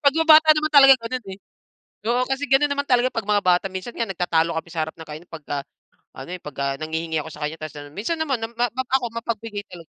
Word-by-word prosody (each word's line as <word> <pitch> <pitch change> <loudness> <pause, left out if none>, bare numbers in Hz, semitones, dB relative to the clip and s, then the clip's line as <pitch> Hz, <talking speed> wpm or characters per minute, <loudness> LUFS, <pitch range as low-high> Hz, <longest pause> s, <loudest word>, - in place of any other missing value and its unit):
Pag 280 0 +4
yung 325 0 +2
bata 310 0 +8
naman 305 0 0
talaga 275 -2 +9
ganun, 240 +1 -5
eh. 190 - -8 0.7
Oo, 245 +2 +2
kasi 270 +2 -1
ganun 275 +2 +4
naman 285 0 -1
talaga 250 0 +3
'pag 225 -2 -4
mga 205 -1 +3
bata. 180 +1 +3
Minsan 190 +5 -6
nga 230 - -1
nagtatalo 170 -3 0
kami 160 +1 -4
sa 165 - -3
harap 160 - -9
ng 160 -1 -11
kainan 155 +4 -9
'pagka 150 -3 -5 0.6
ano, 135 - -8
eh, 180 - -7
'pagka 140 -1 -3
nanghihingi 160 0 -2
ako 160 - -9
sa 150 - -11
kaniya. 150 - -4
Tas 155 -1 -7
ano 145 0 -10
minsan 230 - -2
naman 275 -7 -1
na 225 - -3
ma 240 +1 0
map 260 0 -4
ako 250 - -4
mapagbigay 230 -2 -4
talag 175 -2 -11
210 Hz, 245 wpm, -23 LUFS, 160-260 Hz, 0.7 s, talaga